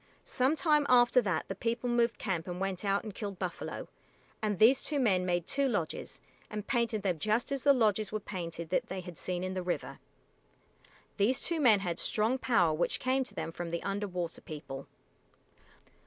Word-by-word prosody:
Some 260 Hz, +4 st, +2 dB
time 300 Hz, -3 st, +3 dB
after 250 Hz, 0 st, +6 dB
that 180 Hz, -8 st, -1 dB
the -, -, -3 dB
people 230 Hz, +4 st, -2 dB
moved 240 Hz, -1 st, +2 dB
camp 175 Hz, -4 st, -2 dB
and 180 Hz, 0 st, -4 dB
went 195 Hz, -1 st, -2 dB
out 200 Hz, +1 st, +1 dB
and 215 Hz, -2 st, -7 dB
killed 200 Hz, -2 st, -5 dB
buffalo, 180 Hz, -2 st, -4 dB, 0.5 s
and 210 Hz, -2 st, 0 dB
these 240 Hz, +7 st, +6 dB
two 295 Hz, -2 st, -1 dB
men 190 Hz, -7 st, +2 dB
made 175 Hz, -1 st, 0 dB
two 280 Hz, 0 st, +1 dB
lodges, 175 Hz, -9 st, -3 dB, 0.3 s
and 210 Hz, -1 st, -5 dB
painted 235 Hz, -4 st, 0 dB
them 180 Hz, -5 st, 0 dB
just 215 Hz, -, 0 dB
as 275 Hz, -1 st, -1 dB
the 285 Hz, -, +6 dB
lodges 215 Hz, -5 st, +2 dB
were 215 Hz, -, -1 dB
painted 170 Hz, -5 st, -6 dB
that 235 Hz, +6 st, +1 dB
they 190 Hz, -2 st, -4 dB
had 180 Hz, -1 st, -9 dB
seen 180 Hz, +2 st, -3 dB
in 185 Hz, 0 st, -2 dB
the 185 Hz, -, -2 dB
river. 180 Hz, 0 st, -3 dB, 1.2 s
These 225 Hz, +5 st, +2 dB
two 335 Hz, -2 st, -1 dB
men 225 Hz, -8 st, +5 dB
had 175 Hz, -3 st, -2 dB
strong 225 Hz, +5 st, +1 dB
power 225 Hz, -12 st, +3 dB
which 155 Hz, -, 0 dB
came 260 Hz, +1 st, +1 dB
to -, -, -11 dB
them 165 Hz, -, -3 dB
from 170 Hz, 0 st, -5 dB
the 170 Hz, 0 st, -3 dB
Under 205 Hz, +1 st, -2 dB
water 175 Hz, -3 st, -4 dB
People. 145 Hz, -3 st, -8 dB
205 Hz, 195 wpm, -31 LUFS, 180-240 Hz, 1.2 s, after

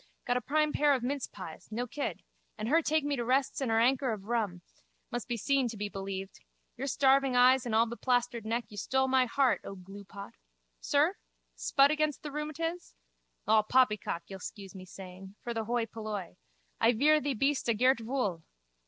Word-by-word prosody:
Got 245 Hz, -, +1 dB
a 250 Hz, -, 0 dB
prime 305 Hz, +2 st, +1 dB
pair 290 Hz, -1 st, +4 dB
of 250 Hz, -, -4 dB
mincepies, 245 Hz, -, -5 dB
no 240 Hz, +3 st, -2 dB
kid. 280 Hz, +4 st, -4 dB, 0.3 s
And 215 Hz, 0 st, -3 dB
her 320 Hz, +6 st, +4 dB
take 315 Hz, -1 st, +1 dB
me 290 Hz, 0 st, 0 dB
to 240 Hz, -, -1 dB
rests 265 Hz, +3 st, +1 dB
and 265 Hz, -, 0 dB
her 225 Hz, 0 st, +3 dB
anker 255 Hz, +2 st, +2 dB
of 205 Hz, -3 st, -7 dB
rum. 210 Hz, -6 st, -2 dB, 0.5 s
Must 240 Hz, -, -4 dB
be 240 Hz, -2 st, -2 dB
seen 275 Hz, +2 st, +1 dB
to 225 Hz, -2 st, -6 dB
be 205 Hz, 0 st, -3 dB
believed. 195 Hz, -1 st, -6 dB, 0.4 s
Your 265 Hz, +3 st, -4 dB
starving 270 Hz, -1 st, +3 dB
eyes 250 Hz, +1 st, +5 dB
and 220 Hz, -, -1 dB
allbeplastered 235 Hz, +1 st, +1 dB
neck 230 Hz, +2 st, -1 dB
you 210 Hz, -, -11 dB
stole 265 Hz, +6 st, +1 dB
my 260 Hz, -1 st, +3 dB
heart, 260 Hz, +1 st, +2 dB
O 195 Hz, -, -7 dB
gluepot. 200 Hz, +1 st, -10 dB, 0.5 s
Sir? -, -, +2 dB, 0.4 s
Spud 275 Hz, -, +4 dB
again 305 Hz, 0 st, +1 dB
the 295 Hz, -, -5 dB
rheumatiz? 310 Hz, +4 st, -4 dB, 0.5 s
All 215 Hz, 0 st, +5 dB
poppycock, 215 Hz, -6 st, +1 dB
you'll 195 Hz, -1 st, -9 dB
scuse 195 Hz, 0 st, -8 dB
me 185 Hz, -1 st, -10 dB
saying. 190 Hz, +1 st, -11 dB
For 240 Hz, -, -3 dB
the 225 Hz, -1 st, -3 dB
hoi 235 Hz, 0 st, 0 dB
polloi. 215 Hz, -, -6 dB, 0.4 s
I 230 Hz, +2 st, +4 dB
vear 300 Hz, +6 st, +4 dB
thee 285 Hz, -2 st, -1 dB
beest 275 Hz, +1 st, 0 dB
a 230 Hz, -, +3 dB
gert 255 Hz, +3 st, +3 dB
vool. 225 Hz, -8 st, -2 dB
240 Hz, 190 wpm, -30 LUFS, 210-275 Hz, 0.5 s, eyes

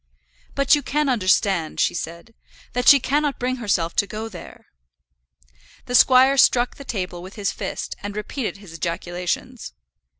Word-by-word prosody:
"But 275 Hz, +1 st, +3 dB
you 295 Hz, -, +4 dB
can 295 Hz, +1 st, -1 dB
understand," 190 Hz, -7 st, +1 dB
she -, -, +2 dB
said, 170 Hz, +6 st, -7 dB, 0.4 s
"that 250 Hz, 0 st, -1 dB
she 280 Hz, -, +9 dB
cannot 290 Hz, +2 st, 0 dB
bring 255 Hz, +1 st, -2 dB
herself 195 Hz, -8 st, -1 dB
to 200 Hz, -, +2 dB
go 220 Hz, +2 st, -6 dB
there." 180 Hz, -5 st, -12 dB, 1.2 s
The 245 Hz, -, -6 dB
squire 260 Hz, +2 st, +6 dB
struck 245 Hz, -2 st, +3 dB
the 280 Hz, -, -9 dB
table 185 Hz, -8 st, -4 dB
with 185 Hz, +2 st, -11 dB
his 205 Hz, -3 st, -1 dB
fist, -, -, -5 dB
and 205 Hz, 0 st, -6 dB
repeated 210 Hz, +2 st, -4 dB
his 195 Hz, -5 st, -13 dB
ejaculations. 175 Hz, -, -4 dB
215 Hz, 155 wpm, -22 LUFS, 180-255 Hz, 1.2 s, she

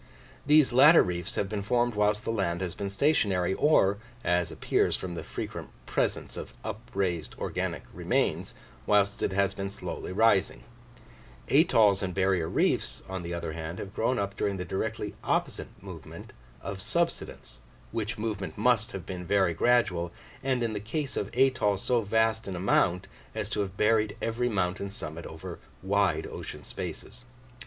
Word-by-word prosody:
These 150 Hz, -4 st, +6 dB
latter 150 Hz, +6 st, +8 dB
reefs 90 Hz, -1 st, -4 dB
have 100 Hz, -, 0 dB
been 100 Hz, +1 st, -3 dB
formed 120 Hz, +3 st, +1 dB
whilst 105 Hz, 0 st, +2 dB
the -, -, 0 dB
land 95 Hz, -5 st, -1 dB
has 90 Hz, -3 st, -2 dB
been 100 Hz, -1 st, -4 dB
stationary, 100 Hz, -, +2 dB
or, 100 Hz, -8 st, +3 dB, 0.2 s
as 90 Hz, 0 st, +1 dB
appears -, -, +1 dB
from 90 Hz, -1 st, -5 dB
the 85 Hz, -, -5 dB
frequent -, -, -6 dB, 0.2 s
presence -, -, -1 dB
of -, -, -7 dB
upraised 90 Hz, -5 st, -3 dB
organic -, -, -3 dB
remains, -, -, 0 dB, 0.3 s
whilst 100 Hz, -1 st, +3 dB
it -, -, +1 dB
has 100 Hz, 0 st, +2 dB
been 100 Hz, 0 st, -4 dB
slowly 100 Hz, -, -6 dB
rising: 100 Hz, -, +3 dB, 0.9 s
atolls 105 Hz, -3 st, +5 dB
and 90 Hz, -2 st, -3 dB
barrier 95 Hz, -4 st, +2 dB
reefs, -, -, 0 dB
on 95 Hz, -1 st, -4 dB
the 85 Hz, 0 st, -4 dB
other 85 Hz, -2 st, -4 dB
hand, 80 Hz, +2 st, -5 dB
have 95 Hz, +1 st, -7 dB
grown 125 Hz, +4 st, +1 dB
up 100 Hz, -2 st, -2 dB
during 100 Hz, -1 st, -1 dB
the 90 Hz, -, -4 dB
directly 105 Hz, +3 st, -3 dB
opposite -, -, -1 dB, 0.2 s
movement -, -, -10 dB, 0.3 s
of 95 Hz, -1 st, -5 dB
subsidence, 120 Hz, -, -2 dB, 0.3 s
which 115 Hz, +2 st, -3 dB
movement 105 Hz, -3 st, -3 dB
must 115 Hz, 0 st, +2 dB
have 95 Hz, -3 st, -6 dB
been 90 Hz, -2 st, -5 dB
very 95 Hz, -1 st, +2 dB
gradual, 90 Hz, -5 st, +2 dB, 0.3 s
and 130 Hz, -2 st, 0 dB
in 115 Hz, -2 st, -1 dB
the 105 Hz, -, -2 dB
case 130 Hz, +7 st, -3 dB
of 100 Hz, -, -2 dB
atolls 120 Hz, -7 st, +3 dB
so 120 Hz, -2 st, +2 dB
vast 110 Hz, +1 st, +1 dB
in 95 Hz, -, -3 dB
amount 90 Hz, 0 st, +2 dB, 0.3 s
as -, -, -3 dB
to -, -, -1 dB
have 100 Hz, -1 st, -2 dB
buried 105 Hz, -1 st, +2 dB
every 120 Hz, +2 st, 0 dB
mountain 100 Hz, -1 st, -1 dB
summit 85 Hz, -6 st, -6 dB
over 85 Hz, +2 st, -8 dB, 0.2 s
wide 95 Hz, -5 st, +2 dB
ocean -, -, -7 dB
spaces. 120 Hz, +3 st, -7 dB
100 Hz, 165 wpm, -28 LUFS, 90-115 Hz, 0.9 s, latter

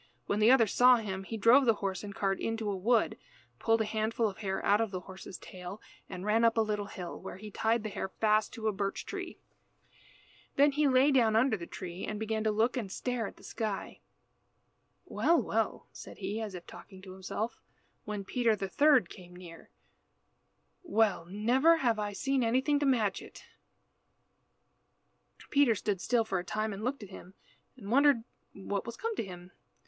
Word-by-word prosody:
When 205 Hz, -, -1 dB
the 215 Hz, +2 st, +5 dB
other 255 Hz, -3 st, +6 dB
saw 250 Hz, +4 st, +6 dB
him 195 Hz, -4 st, -4 dB
he 225 Hz, -, -5 dB
drove 235 Hz, +6 st, +6 dB
the 225 Hz, -, +5 dB
horse 195 Hz, -2 st, -3 dB
and 200 Hz, -1 st, -7 dB
cart 195 Hz, -1 st, 0 dB
into 225 Hz, -2 st, -2 dB
a -, -, -2 dB
wood, 220 Hz, +5 st, +1 dB, 0.4 s
pulled 225 Hz, 0 st, +2 dB
a -, -, +1 dB
handful 220 Hz, +1 st, 0 dB
of 195 Hz, -, -7 dB
hair 195 Hz, -2 st, -3 dB
out 205 Hz, +2 st, +4 dB
of 225 Hz, -, 0 dB
the 185 Hz, -2 st, -5 dB
horse's 190 Hz, 0 st, -10 dB
tail, 180 Hz, +2 st, -9 dB, 0.3 s
and 185 Hz, +1 st, -6 dB
ran 220 Hz, +2 st, +2 dB
up 230 Hz, 0 st, +3 dB
a -, -, +5 dB
little 210 Hz, -2 st, -2 dB
hill, 180 Hz, -3 st, -7 dB
where -, -, -8 dB
he 210 Hz, +2 st, -9 dB
tied 225 Hz, +2 st, 0 dB
the 215 Hz, -, -3 dB
hair 190 Hz, -, -4 dB
fast 215 Hz, +1 st, +1 dB
to 225 Hz, -2 st, -4 dB
a -, -, +3 dB
birch 195 Hz, 0 st, -3 dB
tree. 375 Hz, -3 st, -6 dB, 1.2 s
Then 285 Hz, +1 st, +5 dB
he 295 Hz, +1 st, +2 dB
lay 265 Hz, +2 st, +4 dB
down 230 Hz, -5 st, +3 dB
under 230 Hz, +1 st, +3 dB
the 170 Hz, -4 st, -7 dB
tree 180 Hz, 0 st, -7 dB
and 210 Hz, -1 st, -4 dB
began 220 Hz, 0 st, -2 dB
to -, -, +3 dB
look 225 Hz, +4 st, +1 dB
and 220 Hz, -7 st, -4 dB
stare 245 Hz, -2 st, -2 dB
at -, -, -11 dB
the -, -, -18 dB
sky. 215 Hz, -3 st, -4 dB, 1.1 s
"Well, 340 Hz, 0 st, +2 dB
well," -, -, -1 dB
said -, -, -11 dB
he, 205 Hz, +3 st, -4 dB
as 210 Hz, -4 st, -5 dB
if 175 Hz, -, -9 dB
talking 190 Hz, -2 st, -13 dB
to 190 Hz, -, -10 dB
himself, 190 Hz, +4 st, -4 dB, 0.4 s
when 205 Hz, -2 st, -5 dB
Peter 230 Hz, +1 st, +1 dB
the 195 Hz, -1 st, -4 dB
third 285 Hz, +4 st, +4 dB
came 180 Hz, -2 st, -13 dB
near. 175 Hz, -2 st, -12 dB, 1.1 s
"Well! 220 Hz, -, +1 dB
never 245 Hz, -, +4 dB
before 315 Hz, -, -3 dB
have 230 Hz, -3 st, +2 dB
I 205 Hz, -1 st, -3 dB
seen 270 Hz, +4 st, 0 dB
anything 260 Hz, +5 st, +2 dB
to 285 Hz, -, +1 dB
match 220 Hz, -7 st, +1 dB
it." -, -, -13 dB, 2.1 s
Peter 280 Hz, -5 st, +4 dB
stood 200 Hz, -2 st, -2 dB
still 240 Hz, -2 st, +2 dB
for 190 Hz, -4 st, -1 dB
a -, -, -5 dB
time 215 Hz, +3 st, -2 dB
and 200 Hz, +2 st, -7 dB
looked 255 Hz, -1 st, -2 dB
at 200 Hz, -, -10 dB
him, 190 Hz, 0 st, -12 dB, 0.4 s
and 210 Hz, -4 st, -8 dB
wondered 275 Hz, -2 st, +4 dB, 0.3 s
what 200 Hz, +1 st, -4 dB
was 235 Hz, -, -6 dB
come 455 Hz, 0 st, -3 dB
to -, -, 0 dB
him. 180 Hz, -2 st, -10 dB
215 Hz, 195 wpm, -31 LUFS, 195-240 Hz, 2.1 s, other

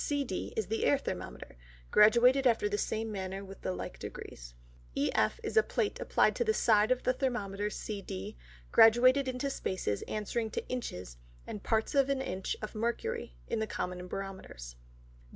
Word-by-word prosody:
CD, 280 Hz, -9 st, -2 dB
is 220 Hz, -, +1 dB
the 220 Hz, +4 st, -2 dB
Air 285 Hz, -, +4 dB
Thermometer, 165 Hz, -, -6 dB, 0.3 s
graduated 245 Hz, +5 st, +6 dB
after 225 Hz, -3 st, +3 dB
the 205 Hz, -, -1 dB
same 220 Hz, 0 st, -2 dB
manner 195 Hz, 0 st, -4 dB
with 195 Hz, 0 st, -11 dB
the -, -, -2 dB
like 90 Hz, 0 st, -6 dB
Degrees. -, -, -9 dB, 0.4 s
EF, 110 Hz, -, +1 dB
is -, -, -4 dB
a -, -, +9 dB
Plate 430 Hz, -1 st, -1 dB
applied -, -, +2 dB
to -, -, +2 dB
the 440 Hz, -1 st, +1 dB
side 215 Hz, -2 st, +4 dB
of 255 Hz, 0 st, +1 dB
the 255 Hz, -, +2 dB
Thermometer 210 Hz, -6 st, -2 dB
CD, 200 Hz, -, -6 dB, 0.4 s
graduated 255 Hz, +4 st, +6 dB
into 255 Hz, +2 st, -2 dB
Spaces 185 Hz, -, -2 dB
answering 220 Hz, +2 st, -2 dB
to -, -, -4 dB
Inches 90 Hz, -, -5 dB, 0.3 s
and 210 Hz, -, -6 dB
parts 220 Hz, +1 st, 0 dB
of 275 Hz, -1 st, +3 dB
an 275 Hz, -1 st, +1 dB
Inch 190 Hz, -7 st, -3 dB
of 215 Hz, -, -5 dB
Mercury, 220 Hz, -, -3 dB
in -, -, -1 dB
the 220 Hz, -, -1 dB
common 180 Hz, -2 st, -4 dB
Barometers. 190 Hz, -, -7 dB
215 Hz, 170 wpm, -31 LUFS, 190-255 Hz, 0.4 s, a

